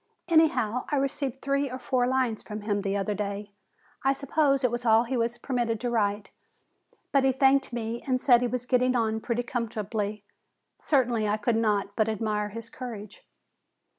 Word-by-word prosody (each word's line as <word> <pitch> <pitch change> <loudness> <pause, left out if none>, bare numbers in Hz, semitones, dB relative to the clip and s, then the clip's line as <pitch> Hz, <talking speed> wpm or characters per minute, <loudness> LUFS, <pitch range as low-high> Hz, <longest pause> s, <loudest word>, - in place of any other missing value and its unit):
Anyhow, 255 -8 +3
I - - +2
received 270 -1 -2
three 275 0 0
or 255 - -5
four 250 -1 0
lines 255 -4 0
from 210 0 -7
him 205 -1 -1
the 200 0 -1
other 200 +1 -1
day. 205 0 -4 0.5
I 270 +1 +3
suppose 275 0 +1
it 250 - +3
was 240 0 -3
all 225 -1 +5
he 250 +2 -3
was 235 0 -1
permitted 240 -3 -1
to 245 -1 -1
write. 205 -2 0 0.8
But 275 -1 +3
he 270 - +4
thanked 270 +1 +3
me 235 0 -3
and 255 -1 +1
said 245 -2 +5
he 245 - +1
was 250 0 -3
getting 250 0 +2
on 220 -2 0
pretty 240 +1 -1
comfortably. 215 -3 -3 0.6
Certainly 240 -7 +1
I 210 +1 +1
could 220 +2 0
not 205 -3 0
but 220 -1 +2
admire 210 -1 -1
his 230 +2 -8
courage." 225 -4 -9
235 Hz, 180 wpm, -27 LUFS, 215-255 Hz, 0.8 s, all